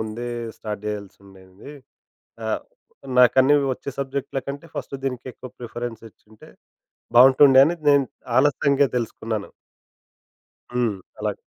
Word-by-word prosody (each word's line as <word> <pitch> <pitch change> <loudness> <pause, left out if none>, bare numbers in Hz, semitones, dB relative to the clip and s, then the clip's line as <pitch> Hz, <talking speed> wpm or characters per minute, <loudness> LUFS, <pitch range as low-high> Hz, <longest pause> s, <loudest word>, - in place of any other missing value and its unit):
ముందే 110 +2 -5 0.3
స్టార్ట్ 105 -2 -6
జేయాల్సుండేంది. 100 +1 -9 0.7
ఆ! - - -3 0.7
నాకన్నీ 130 +3 +6 0.2
ఒచ్చే 140 - -8
సబ్జెకటూల 135 0 -3
కంటే 140 +4 -6
ఫస్ట్ - - -5
దీనికి 125 -3 -4
ఎక్కువ 130 - -11
ప్రిఫరెన్స్ 120 -1 -6
ఇచ్చుంటే 110 0 -20 0.7
బావుంటుండే, 130 +2 +7
అని 170 +3 0
నేను 140 -1 +5 0.3
ఆలస్యంగా 140 0 +3
తెలుసుకున్నాను. 110 -2 -4 1.2
హ్మ్. 120 -5 0 0.2
అలాగ. - - -2
125 Hz, 105 wpm, -23 LUFS, 110-140 Hz, 1.2 s, బావుంటుండే